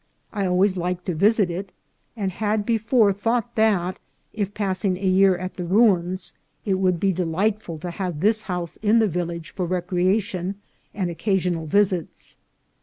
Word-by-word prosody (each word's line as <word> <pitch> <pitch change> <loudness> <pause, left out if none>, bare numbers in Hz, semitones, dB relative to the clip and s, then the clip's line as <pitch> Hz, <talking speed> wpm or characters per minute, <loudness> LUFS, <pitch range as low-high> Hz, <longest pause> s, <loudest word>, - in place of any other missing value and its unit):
I 200 -3 -1
always 185 +1 +2
liked 180 0 -2
to 180 - -1
visit 200 +2 +3
it, 185 +3 -5 0.5
and 195 -3 -1
had 210 +2 -1
before 225 -2 +3
thought 235 +4 -1
that, 195 -5 +1 0.3
if 205 -2 -2
passing 190 -2 -1
a 195 - -5
year 190 0 +4
at 185 +1 -5
the 180 - -3
ruins, 185 -2 +2 0.3
it 190 -3 +1
would 185 -2 +2
be 195 +1 +2
delightful 180 +1 -1
to 175 +3 -5
have 175 -3 -4
this 215 +5 +2
house 180 -4 -4
in 215 +1 +3
the 220 -1 +4
village 170 -2 -4
for 180 -3 -3
rec 180 0 -3
reation 185 +1 0 0.4
and 185 -4 -2
occasional 180 -3 -1
visits. 190 -1 0
190 Hz, 165 wpm, -23 LUFS, 180-205 Hz, 0.5 s, year